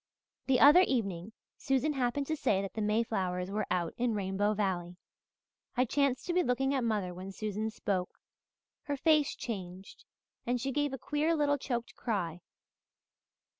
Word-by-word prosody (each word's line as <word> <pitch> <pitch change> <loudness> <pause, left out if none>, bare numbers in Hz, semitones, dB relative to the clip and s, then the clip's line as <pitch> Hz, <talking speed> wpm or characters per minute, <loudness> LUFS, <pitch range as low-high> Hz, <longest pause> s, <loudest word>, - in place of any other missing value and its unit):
"The 260 -2 +4
other 295 +7 +9
evening 205 - -1 0.3
Susan 270 +2 +1
happened 265 +1 0
to 315 - -1
say 205 -9 +1
that 195 - -6
the 220 - -3
mayflowers 195 -4 0
were 210 +1 -1
out 170 -2 0
in 240 -2 0
Rainbow 205 +1 0
Valley. 180 -4 -2 0.8
I 250 - +4
chanced 275 0 +1
to 350 - -1
be 360 - +4
looking 270 0 +1
at 265 -3 0
mother 210 -6 -1
when 185 +2 -7
Susan 215 +2 -3
spoke. 195 -4 -3 0.7
Her 285 -1 -2
face 305 0 +3
changed 190 -4 -7 0.4
and 245 +1 0
she 270 +3 -2
gave 290 +1 0
a 270 - -4
queer 305 +4 0
little 290 -2 +2
choked 240 -3 -3
cry. 180 -7 -2
230 Hz, 160 wpm, -31 LUFS, 195-275 Hz, 0.8 s, other